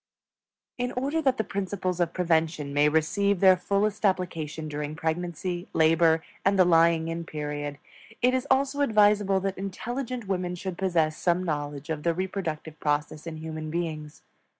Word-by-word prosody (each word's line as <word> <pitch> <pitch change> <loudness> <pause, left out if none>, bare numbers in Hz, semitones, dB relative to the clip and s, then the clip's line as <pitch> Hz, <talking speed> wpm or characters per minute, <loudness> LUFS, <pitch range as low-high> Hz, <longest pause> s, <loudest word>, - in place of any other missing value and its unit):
In 245 0 -1
order 280 +6 -1
that 265 -3 +2
the 220 - +1
principles 190 -3 -3
of 170 -1 +1
prevention 160 -5 0
may 145 +1 +4
receive 195 +6 +1
their 190 0 +7
fullest 200 +3 -1
application 165 -5 -1
during 150 0 -4
pregnancy, 175 +2 -3
labor, 160 0 +4 0.2
and 195 0 +3
the 185 - +6
lying 165 -1 +4
in 165 0 -3
period, 145 -2 -4 0.4
it 250 +1 +3
is 260 +2 -1
also 275 +2 +2
advisable 210 -5 +4
that 195 -1 -3
intelligent 240 +4 -4
women 180 -2 -1
should 185 0 -5
possess 165 -5 +1
some 175 +1 +1
knowledge 145 -2 -3
of 155 -2 -3
the 170 +1 +1
Reproductive 165 -4 -4
Process 150 +1 -1
in 160 -1 -5
human 155 0 -6
beings. 155 -2 -4
175 Hz, 155 wpm, -27 LUFS, 155-200 Hz, 0.4 s, their